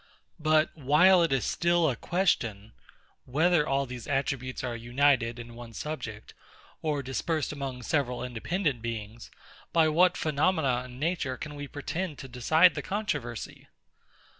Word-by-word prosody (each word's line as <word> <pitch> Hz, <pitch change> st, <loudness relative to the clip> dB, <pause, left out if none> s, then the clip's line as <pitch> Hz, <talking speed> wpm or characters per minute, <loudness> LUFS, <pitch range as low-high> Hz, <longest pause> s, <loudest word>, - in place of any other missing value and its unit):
But 155 Hz, 0 st, +2 dB
while 165 Hz, +6 st, +5 dB
it 165 Hz, -, +2 dB
is 135 Hz, -2 st, +1 dB
still 170 Hz, -1 st, +2 dB
a 130 Hz, -, 0 dB
question, 115 Hz, -, 0 dB, 0.5 s
Whether 155 Hz, +3 st, +2 dB
all 135 Hz, +1 st, +1 dB
these 125 Hz, -2 st, -8 dB
attributes 135 Hz, -3 st, -2 dB
are 120 Hz, -2 st, -2 dB
united 120 Hz, 0 st, +2 dB
in 120 Hz, 0 st, -9 dB
one 115 Hz, -1 st, -10 dB
subject, 110 Hz, -5 st, -6 dB, 0.5 s
or 150 Hz, -3 st, -1 dB
dispersed 150 Hz, +3 st, -2 dB
among 135 Hz, -4 st, -5 dB
several 125 Hz, -4 st, -1 dB
independent 130 Hz, -, -2 dB
beings, 115 Hz, 0 st, -6 dB, 0.4 s
by 160 Hz, -2 st, +4 dB
what 180 Hz, +3 st, +4 dB
phenomena 145 Hz, -5 st, +1 dB
in 125 Hz, -1 st, -11 dB
nature 155 Hz, -3 st, -1 dB
can 150 Hz, -, -7 dB
we 145 Hz, -1 st, -6 dB
pretend 155 Hz, +3 st, -4 dB
to 135 Hz, -, -8 dB
decide 155 Hz, +8 st, +4 dB
the -, -, -4 dB
controversy? 150 Hz, -, -4 dB
140 Hz, 140 wpm, -28 LUFS, 120-160 Hz, 0.5 s, while